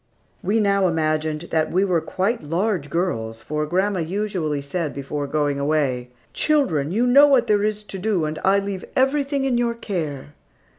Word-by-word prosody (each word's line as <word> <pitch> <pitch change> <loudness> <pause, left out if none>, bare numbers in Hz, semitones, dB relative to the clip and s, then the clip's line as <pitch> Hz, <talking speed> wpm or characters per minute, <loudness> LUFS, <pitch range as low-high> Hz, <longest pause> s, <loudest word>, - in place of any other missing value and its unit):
We 205 +5 +1
now 200 -2 +3
imagined 155 -2 0
that 160 -1 +1
we 185 +3 +2
were 175 -4 +1
quite 195 +9 -1
large 170 0 -1
girls, 115 -10 -2
for 150 +4 -3
grandma 190 +3 0
usually 175 -4 -2
said 150 +2 -3
before 140 +1 -4
going 145 -1 0
away, 140 -4 0 0.2
"Children, 190 - +1
you 230 +6 +2
know 280 +4 +7
what 270 -4 +4
there 205 -1 +2
is 210 0 -1
to 195 -2 -6
do 190 -5 0
and 155 0 -4
I 195 +1 +4
leave 200 -1 -3
everything 275 +1 +1
in 250 -3 +1
your 235 -1 0
care." 155 - -4
180 Hz, 170 wpm, -22 LUFS, 150-210 Hz, 0.2 s, know